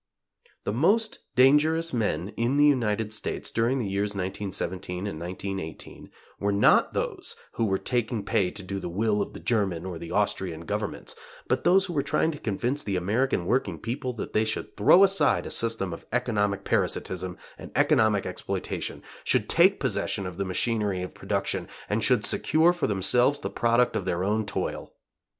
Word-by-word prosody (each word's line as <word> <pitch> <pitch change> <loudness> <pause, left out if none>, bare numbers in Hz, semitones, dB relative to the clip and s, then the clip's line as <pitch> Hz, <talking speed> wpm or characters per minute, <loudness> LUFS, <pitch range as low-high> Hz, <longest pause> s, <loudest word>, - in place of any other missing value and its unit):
The 100 - -2
most 205 - +2 0.2
dangerous 150 +5 +4
men 105 -5 -1
in 120 +6 -1
the 145 - +6
United 110 -6 +1
States, 105 - -3
during 115 +4 +1
the 120 - -1
years 100 +1 -2
1917 95 -1 -4
and 100 -7 -4
1918, 95 0 -6 0.3
were 100 0 0
not 100 +1 +4
those - - -3 0.2
who 115 - -1
were 95 -2 +1
taking 115 -3 -2
pay 95 -3 +2
to 100 +2 -7
do 100 +1 -4
the 90 - -5
will 105 +3 +1
of - - -4
the - - -8
German 95 -7 0
or 90 -3 -5
the 85 - -8
Austrian 95 -5 -1
Governments, 105 +5 -4 0.3
but - - 0
those 190 +2 +5
who 180 - -5
were 145 - +1
trying 160 - +1
to 150 - -8
convince 120 +7 -1
the 100 -7 -2
American 100 +2 0
working 100 -5 0
people 125 - -3
that 115 - -6
they 110 - +3
should 110 0 -3
throw 175 - +6
aside 190 -7 +3
a - - -6
system 115 -6 -1
of - - -10
economic 105 -5 0
parasitism 95 -1 -1 0.2
and - - -9
economic 110 -3 +3
exploitation, - - -4 0.2
should - - +1
take - - +4
possession 100 - -1
of 90 -1 -6
the 100 - -1
machinery 100 -1 -1
of 90 - -7
production - - -2 0.2
and 105 +1 0
should 120 -2 +3
secure 160 +3 +3
for 175 - -1
themselves 120 +8 +3
the 100 - -4
product 120 +3 +2
of - - -2
their 85 +1 -1
own 105 +2 0
toil. - - -4
105 Hz, 175 wpm, -26 LUFS, 95-125 Hz, 0.3 s, the